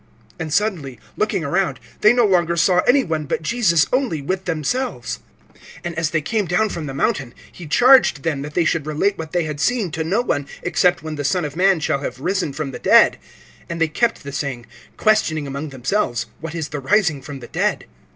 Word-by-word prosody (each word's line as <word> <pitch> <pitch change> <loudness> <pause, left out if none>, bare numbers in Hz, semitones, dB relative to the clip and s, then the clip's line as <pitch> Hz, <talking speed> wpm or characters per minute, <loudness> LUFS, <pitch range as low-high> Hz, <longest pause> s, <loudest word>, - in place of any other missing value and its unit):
(8)And 160 -2 -4
suddenly, 170 - -1 0.2
looking 215 -5 0
around, 175 +5 0 0.2
they 215 - +6
no 240 -1 +4
longer 175 -4 +2
saw 180 +2 +4
any 265 +2 +5
one, 160 -3 -2
but 150 - -2
Jesus 170 -5 +3
only 255 - +1
with 185 +6 -3
themselves. 155 - -2 0.7
(9)And 175 - -3
as 165 -1 -1
they 155 -2 -1
came 215 +5 0
down 180 +5 +1
from 165 -5 -5
the 135 - -5
mountain, 135 -2 -1 0.2
he 175 - -10
charged 245 - +5
them 150 -4 -1
that 150 +1 -7
they 175 - +2
should 155 -2 0
relate 155 +7 +1
what 160 -1 -6
they 175 -1 +1
had 150 -2 -5
seen 215 0 0
to 160 0 -2
no 195 +9 +1
one, 145 - -2 0.2
except 175 -1 +2
when 155 -1 -5
the 145 - -3
Son 155 +4 0
of 145 0 -6
man 190 0 +3
shall 145 -2 0
have 135 - -5
risen 180 0 -1
from 140 -1 -4
the - - -7
dead. - - +5 0.5
(10)And 170 - -4
they 165 -1 +2
kept 225 +8 0
the 140 - -7
saying, 135 -4 -4 0.3
questioning 190 -9 +2
among 140 +2 -5
themselves, 135 - -1
what 165 0 -6
is 160 -3 -3
the 145 - -4
rising 160 -1 +1
from 140 0 -8
the 120 - -10
dead. - - -1
165 Hz, 210 wpm, -20 LUFS, 145-195 Hz, 0.7 s, they